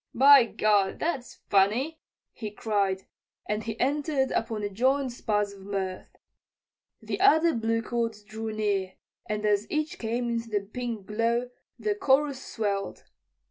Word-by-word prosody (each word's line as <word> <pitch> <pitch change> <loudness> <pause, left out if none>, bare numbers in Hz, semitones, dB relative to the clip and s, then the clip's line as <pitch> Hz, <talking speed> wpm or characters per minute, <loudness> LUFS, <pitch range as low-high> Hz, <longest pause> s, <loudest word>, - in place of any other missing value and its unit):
"By 275 0 +8
gad, 205 -3 +2
that's 275 -8 -3
funny," 225 +11 +2 0.3
he 215 -3 -5
cried, 200 -3 -1 0.4
and 210 +1 -1
he 225 0 -5
entered 280 0 +1
upon 225 -2 -1
a 205 - -1
joint 260 +6 +1
spasm 205 -4 -1
of 190 - -13
mirth. 190 -2 -4 0.9
The - - -3
other 335 -4 +5
bluecoats 230 -1 -1
drew 220 +1 -5
near, 200 -3 -1 0.3
and 210 0 -2
as 210 0 +1
each 305 0 -2
came 235 +2 -1
into 230 -1 -2
the 205 -2 0
pink 225 0 -5
glow 230 +3 0 0.3
the 425 - 0
chorus 285 -7 +2
swelled. 200 -3 -3
225 Hz, 140 wpm, -27 LUFS, 205-260 Hz, 0.9 s, By